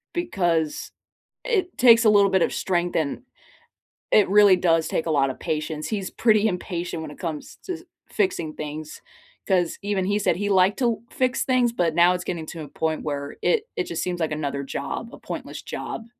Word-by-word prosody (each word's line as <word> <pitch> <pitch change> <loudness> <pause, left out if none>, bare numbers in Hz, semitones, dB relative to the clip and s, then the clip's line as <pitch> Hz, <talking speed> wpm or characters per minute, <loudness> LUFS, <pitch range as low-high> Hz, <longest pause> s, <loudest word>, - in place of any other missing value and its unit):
because 175 - -1 0.5
it 390 -7 0
takes 230 -2 +7
a 220 - +6
little 200 -1 +5
bit 190 - +3
of - - +2
strength 175 -1 -1
and 155 - -1 0.9
it 210 - +5
really 205 -1 +7
does 165 -3 +2
take 165 - -2
a - - +1
lotta 135 -3 +2
patience. 155 0 -3
He's 200 -4 -3
pretty 220 -2 +3
impatient 175 -3 -3
when 155 -2 -7
it - - -13
comes 160 -4 -5
to 365 -2 -4 0.3
fixing 170 - -1
things, 150 0 -7 0.5
'cause 180 -3 +1
even 200 -2 -1
he 205 +2 +1
said 170 - +2
he 205 +2 -2
liked 190 +3 +3
to 235 -4 +1
fix 255 -1 0
things, 250 -2 +2
but 170 -8 0
now 175 +1 +5
it's 180 0 -3
getting 170 -3 -4
to 165 - -7
a 145 - -8
point 160 -1 -2
where 145 -1 -4
it 465 -3 +2
it 380 -5 -1
just 355 - -4
seems 180 -1 -3
like 160 -1 -1
another 140 -2 -2
job, 140 +11 -5
a - - -9
pointless - - -7
job, 225 - -6
180 Hz, 195 wpm, -24 LUFS, 160-215 Hz, 0.9 s, takes